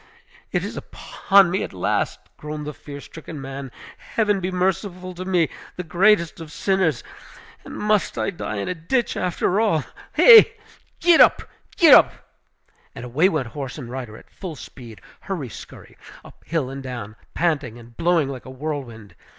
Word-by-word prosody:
"It - - 0
is - - -5
upon 195 -3 +2
me 190 - 0
at - - -5
last!" 90 - -1 0.2
groaned 150 0 -7
the 150 - -5
fear 140 0 -10
stricken 160 +1 -10
man. 135 -1 -7 0.4
"Heaven 210 -3 +2
be 185 0 -2
merciful 185 0 -2
to 180 +1 -7
me, 180 -4 +2 0.3
the 180 - -5
greatest 175 +1 +2
of 155 -2 -9
sinners! 190 -2 0 0.6
And - - -9
must 210 -1 0
I - - -1
die 165 - -5
in 100 - -3
a - - -1
ditch, 220 +9 -1
after 180 +2 0
all? 170 -10 +2 0.3
He! 465 -3 +9 0.5
get 345 -2 +6
up, - - +5 0.3
get 330 -3 +8
up!" - - +7 0.8
And - - -7
away 150 +10 +2
went 150 -10 -2
horse 135 -2 -6
and 125 -5 -8
rider 125 -4 -6
at - - -18
full 180 -5 -7
speed, 115 -9 -12 0.2
hurry 165 -10 -5
scurry, - - -12 0.3
up - - -16
hill 155 -6 -1
and 135 0 -7
down, 120 -5 -7 0.2
panting 145 -9 -1
and 120 0 -15
blowing 170 -2 +2
like 135 -2 -7
a - - -9
whirlwind. 130 - -6
160 Hz, 170 wpm, -22 LUFS, 130-185 Hz, 0.8 s, He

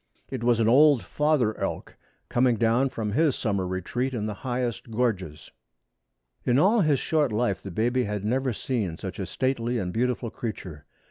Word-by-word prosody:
It 130 -3 -4
was 120 -1 +3
an 110 - +3
old 140 -1 +5
father 140 - +1
elk - - -4 0.3
coming 125 -1 +2
down 115 +4 +2
from 110 -4 -3
his 150 +4 +2
summer 100 -4 -1
retreat 120 +8 -2
in 105 -3 -2
the 105 - -3
highest 120 0 -3
gorges. 105 -10 -2 0.9
In 125 - +2
all 205 +9 +4
his 150 -5 +3
short 150 -2 +1
life 105 -3 0
the 100 - -7
baby 120 +7 0
had 105 -1 -3
never 130 +4 0
seen 105 -7 -2
such 95 +3 -7
a 95 - -3
stately 125 +2 -1
and 90 -5 -3
beautiful 120 -1 -1
creature. 90 -11 -7
120 Hz, 175 wpm, -26 LUFS, 105-130 Hz, 0.9 s, old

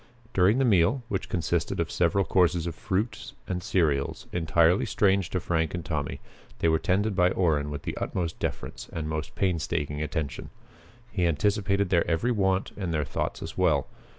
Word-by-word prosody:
During 95 +5 +4
the 135 - +3
meal, 115 +4 +3
which 95 - -3
consisted 85 -4 -1
of - - -1
several 90 +3 +2
courses 90 -3 +2
of 85 - -3
fruits 105 +5 -3
and 90 -1 -2
cereals 75 -7 0
entirely 85 +1 +3
strange 95 -3 +2
to 90 - -1
Frank 80 -1 -1
and 85 -3 -5
Tommy, 75 -4 -3 0.4
they - - +1
were 80 0 +3
tended 100 +2 +1
by 90 -1 +4
Orrin 80 -6 +1
with 75 -1 -5
the - - -4
utmost 85 -3 -3
deference - - -4
and 80 -2 -4
most 80 -1 -4
painstaking 80 -5 -1
attention. 75 -2 -3 0.6
He 90 -4 +1
anticipated 100 +3 +1
their 85 -2 +3
every 85 +9 +1
want 95 -3 +1
and 95 -4 -3
their 75 -2 0
thoughts - - -3
as - - -7
well. - - +2
90 Hz, 175 wpm, -27 LUFS, 80-95 Hz, 0.6 s, During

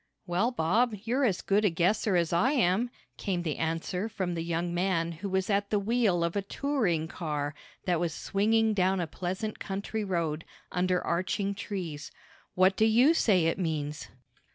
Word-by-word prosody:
"Well, 180 +7 +1
Bob, 235 +2 +1
you're 255 +4 +1
as 190 -7 +1
good 200 +2 +2
a 205 - +4
guesser 185 +4 +1
as 170 -1 +1
I 240 +12 +3
am," 230 -2 +2 0.3
came 180 -4 -2
the 155 -4 -2
answer 165 +5 -2
from 185 -5 -2
the 165 - -2
young 170 +1 -2
man 175 -2 0
who 175 +5 -6
was 190 0 0
at 200 -1 +1
the 210 - +2
wheel 205 -4 +2
of 170 +2 -1
a 200 - +1
touring 195 - -1
car 150 -5 -3 0.3
that 175 -3 +1
was 170 -1 0
swinging 220 +6 +1
down 190 -1 +2
a 175 - 0
pleasant 190 +6 -4
country 200 +2 -3
road, 165 -5 -1 0.3
under 180 0 0
arching 185 +3 0
trees. 180 -8 -5 0.5
"What 185 +1 +4
do 215 - +3
you 240 +8 +5
say 195 - +3
it 165 +3 0
means?" 150 -4 -2
185 Hz, 175 wpm, -29 LUFS, 170-210 Hz, 0.5 s, you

